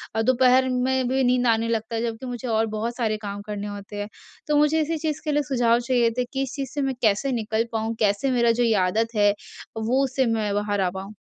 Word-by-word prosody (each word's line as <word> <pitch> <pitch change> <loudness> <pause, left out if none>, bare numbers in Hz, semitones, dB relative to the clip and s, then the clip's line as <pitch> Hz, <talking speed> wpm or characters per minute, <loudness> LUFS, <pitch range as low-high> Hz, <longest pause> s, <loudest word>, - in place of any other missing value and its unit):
और 225 - +2
दोपहर 255 +1 +4
में 255 0 0
भी 265 +1 +1
नींद 250 0 +2
आने 230 0 +2
लगता 225 0 -2
है, 225 - -1
जबकि 230 +2 -4
मुझे 245 0 -5
और 225 -1 +2
बहुत 235 +2 -3
सारे 220 -3 0
काम 200 0 -5
करने 210 -1 -4
होते 205 0 -8
हैं। 205 - -4 0.4
तो 300 -1 +2
मुझे 300 +2 +3
इसी 320 +2 -1
चीज़ 305 -1 -3
के 300 - 0
लिए 295 0 +1
सुझाव 240 -3 +2
चाहिए 240 -1 +2
थे 250 - +1
कि 270 - -1
इस 265 - -6
चीज़ 275 -3 -4
से 290 - -2
मैं 270 -1 -1
कैसे 220 +5 +2
निकल 220 -1 -1
पाऊँ, 225 +1 -2
कैसे 215 +5 +1
मेरा 235 -2 +3
जो 240 +1 +1
ये 230 -2 +3
आदत 225 +5 +1
है 205 -1 +4 0.4
वो 245 +5 +1
उससे 265 0 0
मैं 220 -3 0
बाहर 205 -1 0
आ 185 - +2
पाऊँ? 190 +2 -7
235 Hz, 245 wpm, -24 LUFS, 220-260 Hz, 0.4 s, दोपहर